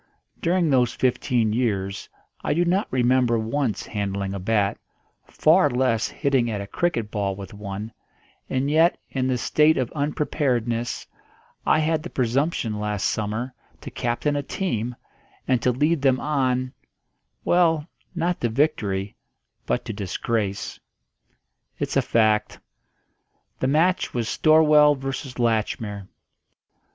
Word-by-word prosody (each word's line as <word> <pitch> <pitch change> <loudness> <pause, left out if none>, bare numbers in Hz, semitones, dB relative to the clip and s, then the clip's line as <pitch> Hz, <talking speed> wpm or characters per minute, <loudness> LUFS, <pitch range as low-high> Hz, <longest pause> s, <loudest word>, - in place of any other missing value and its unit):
During 175 0 +2
those 125 -3 +2
fifteen 120 -3 +1
years 100 -5 -1 0.3
I 145 - 0
do 175 +2 +2
not 185 +4 +1
remember 125 -1 +2
once 115 +1 -1
handling 100 -2 -3
a 100 - -4
bat, 100 +1 0 0.5
far 160 0 +4
less 125 -3 +1
hitting 135 -4 0
at 105 -3 -2
a 100 - -5
cricket 115 - -1
ball 100 -2 -1
with 100 +1 -9
one; 105 +1 -6 0.6
and 135 +2 0
yet, 165 +3 +4
in 130 -1 -1
this 125 -2 -1
state 155 +1 +4
of 125 -2 -1
unpreparedness, 125 -5 -1 0.6
I - - +5
had 155 0 +1
the 175 - -7
presumption 125 -3 0
last 105 -2 -2
summer 110 +4 -2 0.3
to - - -8
captain 125 +4 -1
a 145 - 0
team, 125 - -3 0.5
and 130 -2 +2
to 125 - +2
lead 150 +5 +1
them 130 -2 +3
on 130 -3 0 0.7
well, 165 -3 +3 0.3
not 175 +1 -1
to 120 - +1
victory 105 -7 0 0.5
but - - -1
to 115 - -4
disgrace. 100 +1 -3 1.0
It's - - -3
a - - +4
fact. 110 -2 +1 1.0
The 130 - 0
match 165 +5 +2
was 115 -2 -1
Storwell 150 -1 +5
v. 135 0 -4 0.3
Latchmere. 110 -3 -1
125 Hz, 130 wpm, -24 LUFS, 110-150 Hz, 1.0 s, I